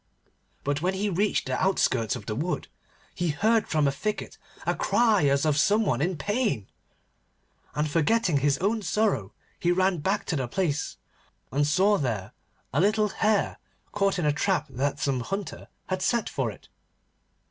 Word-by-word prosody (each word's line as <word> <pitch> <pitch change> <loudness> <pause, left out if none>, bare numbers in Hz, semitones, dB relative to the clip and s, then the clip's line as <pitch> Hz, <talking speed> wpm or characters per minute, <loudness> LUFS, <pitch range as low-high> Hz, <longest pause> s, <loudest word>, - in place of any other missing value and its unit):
But 145 +1 -1
when 185 +2 0
he 195 +2 -1
had 195 -5 -1
reached 210 0 +1
the - - -1
outskirts 130 - +2
of - - -8
the 110 - -3
wood, 160 +10 -2 0.5
he 175 - -1
heard 215 +8 +2
from 150 -2 +2
a - - +2
thicket 210 +10 -4 0.3
a - - +2
cry 220 -10 +3
as 140 +2 +2
of 150 -1 +2
some 210 +5 +3
one 130 -7 +1
in 175 +2 0
pain. 205 - -1 1.1
And 150 +1 +1
forgetting 170 +2 +2
his 140 0 +2
own 210 +6 0
sorrow 195 - 0 0.3
he 175 - +2
ran 185 -1 +2
back 195 +7 0
to 170 - -1
the 130 -4 -1
place, 150 +1 -1 0.5
and 145 +2 +2
saw 195 +7 +3
there 110 -8 -2 0.4
a 145 - +3
little 210 +2 +3
Hare 210 0 +1 0.3
caught 200 -1 +1
in 175 - -1
a 150 - +3
trap 180 -1 +1
that 135 +3 -1
some 135 -3 0
hunter 195 - -5 0.2
had 185 -1 -3
set 235 +4 +1
for - - -1
it. - - -12
175 Hz, 175 wpm, -27 LUFS, 145-205 Hz, 1.1 s, cry